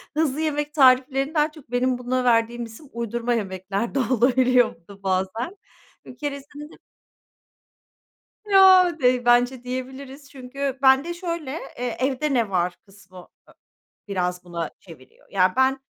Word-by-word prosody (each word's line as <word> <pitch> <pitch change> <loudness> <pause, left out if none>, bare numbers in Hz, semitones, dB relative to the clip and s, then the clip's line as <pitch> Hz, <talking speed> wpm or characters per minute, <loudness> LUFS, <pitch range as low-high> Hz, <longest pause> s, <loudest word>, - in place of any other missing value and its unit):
hızlı 310 -1 0
yemek 295 -1 -2
tariflerini 270 +1 +3
daha 300 -1 +1
çok 300 -6 -17
benim 250 +1 +1
buna 250 +1 -2
verdiğim 235 0 +1
isim 230 +6 -14
uydurma 235 +1 -2
yemekler 195 +2 -3
de - - +2
olabiliyor 250 0 +2
bu 170 0 -31
da 200 -1 -15
bazen. 190 - -2 0.5
Bir 250 - -12
keresinde 290 +1 -7
de - - -16 1.7
Ya 375 -4 +6
dey 250 -1 +2
bence 245 +1 +3
diyebiliriz. 265 +2 -7
Çünkü 270 0 -5
bende 270 +6 +4
şöyle, 335 -5 -5 0.3
eee, 245 -1 -3
evde 275 +3 -1
ne 230 -5 +1
var 180 -1 0
kısmı 190 -2 -18
a 180 - -17 0.6
biraz 180 -2 -2
buna 170 -2 -5
çeviriyor. 160 -8 -17
Ya 185 -2 +2
ben 265 +1 +2
250 Hz, 140 wpm, -23 LUFS, 220-280 Hz, 1.7 s, Ya